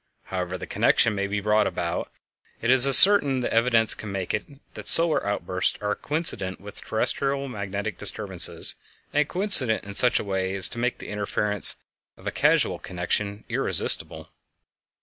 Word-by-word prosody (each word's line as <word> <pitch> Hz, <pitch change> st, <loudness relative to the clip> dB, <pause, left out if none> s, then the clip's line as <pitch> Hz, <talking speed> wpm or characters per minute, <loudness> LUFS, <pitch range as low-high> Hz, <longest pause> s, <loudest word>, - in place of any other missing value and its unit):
However 90 Hz, -1 st, -6 dB
the -, -, -9 dB
connection 115 Hz, -, 0 dB
may 100 Hz, -1 st, -4 dB
be 100 Hz, +1 st, -4 dB
brought 105 Hz, +1 st, 0 dB
about, 85 Hz, -1 st, -6 dB, 0.5 s
it 120 Hz, -, -1 dB
is 130 Hz, 0 st, +8 dB
as 135 Hz, -, +10 dB
certain 140 Hz, -11 st, +6 dB
as -, -, -5 dB
evidence 115 Hz, -1 st, +2 dB
can 105 Hz, -, -9 dB
make 95 Hz, -2 st, -6 dB
it 105 Hz, -, -5 dB, 0.3 s
that -, -, -8 dB
solar 165 Hz, -1 st, +3 dB
outbursts 95 Hz, -2 st, -4 dB
are 105 Hz, 0 st, -4 dB
coincident 145 Hz, -, -2 dB
with 100 Hz, 0 st, -13 dB
terrestial 135 Hz, +5 st, -1 dB
magnetic 100 Hz, -2 st, -7 dB
disturbances, 100 Hz, -3 st, +1 dB, 0.4 s
and 150 Hz, 0 st, -1 dB
coincident 180 Hz, -, +3 dB
in 100 Hz, -, -11 dB
such 125 Hz, +4 st, +3 dB
a -, -, -6 dB
way 95 Hz, -1 st, -5 dB
as 95 Hz, -, 0 dB
to 120 Hz, -, -9 dB
make 125 Hz, +1 st, -3 dB
the -, -, -12 dB
inference 105 Hz, -1 st, +1 dB, 0.4 s
of -, -, -20 dB
a -, -, -4 dB
causal -, -, -1 dB
connection 100 Hz, +4 st, -6 dB
irresistible. -, -, 0 dB
105 Hz, 165 wpm, -22 LUFS, 100-125 Hz, 0.5 s, as